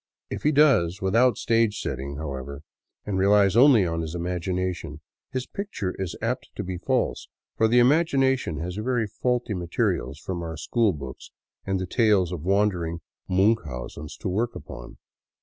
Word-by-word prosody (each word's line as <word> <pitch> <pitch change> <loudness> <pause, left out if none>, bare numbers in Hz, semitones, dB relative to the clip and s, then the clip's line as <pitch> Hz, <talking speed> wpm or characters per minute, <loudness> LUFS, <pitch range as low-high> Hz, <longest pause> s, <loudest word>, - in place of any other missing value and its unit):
If - - -4
he 150 - +3
does 125 - +4
without 115 +5 +3
stage 115 -2 +2
setting, 70 +1 -4
however, 70 -1 -6 0.4
and 95 -2 -1
relies 100 0 +4
only 120 -5 +6
on 80 -1 -2
his 80 +1 -5
imagination, 90 -2 -3 0.3
his 130 -1 -3
picture 125 - -4
is 90 -3 -3
apt 120 +3 -2
to 105 - -4
be 90 -2 -5
false, - - -1 0.3
for 110 - +3
the 120 +2 +3
imagination 135 - +3
has 90 +3 -4
very 120 +1 0
faulty 120 +2 -1
materials 85 -6 -1
from 85 +3 -5
our 80 -1 -5
school 110 +7 +1
books 70 -6 -8 0.4
and 95 -1 0
the 95 - -2
tales 100 -4 +2
of 90 -4 -4
wandering 90 -3 0 0.3
Miinchausens 80 - -1
to - - -3
work 110 +6 -1
upon. - - -9
95 Hz, 155 wpm, -25 LUFS, 85-115 Hz, 0.4 s, only